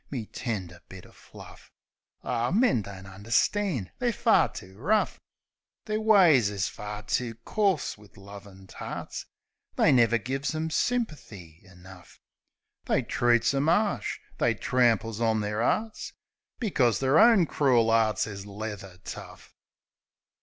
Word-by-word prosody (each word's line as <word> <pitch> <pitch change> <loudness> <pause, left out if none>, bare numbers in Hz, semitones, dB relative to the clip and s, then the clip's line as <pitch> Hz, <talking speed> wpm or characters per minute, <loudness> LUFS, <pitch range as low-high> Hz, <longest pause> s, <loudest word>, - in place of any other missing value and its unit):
My 120 -6 -5
tender 95 -8 -5
bit 95 -2 -11
o' - - -17
fluff! - - -15 0.5
Ar, 120 +1 -1
men 215 - +3
don't 95 -1 -10
understand; 115 - -1
they're 245 -1 +1
fur 235 0 +3
too 95 -2 -11
rough; 200 - 0 0.7
Their 215 0 -2
ways 175 - +5
is 100 -5 -2
fur 105 +3 -7
too 115 +2 -2
coarse 195 - 0
wiv 105 -1 -19
lovin' 100 -1 -13
tarts; - - -7 0.5
They - - +4
never 120 -2 +4
gives 135 +6 -3
'em 160 +1 -2
symperthy 145 - -3
enough. 90 -2 -16 0.7
They - - +1
treats 120 +1 +2
'em 140 +3 +1
'arsh; 205 +3 0 0.2
they - - +2
tramples 115 -3 +1
on 110 -2 +1
their 105 +1 -3
'earts; 215 - -1 0.5
Bpcos 135 - +1
their 135 +3 +3
own 225 -6 +6
crool 125 -7 +2
'earts 110 -3 +2
is 100 -1 -8
leather 100 -3 -7
tough. - - -10
115 Hz, 130 wpm, -27 LUFS, 100-160 Hz, 0.7 s, own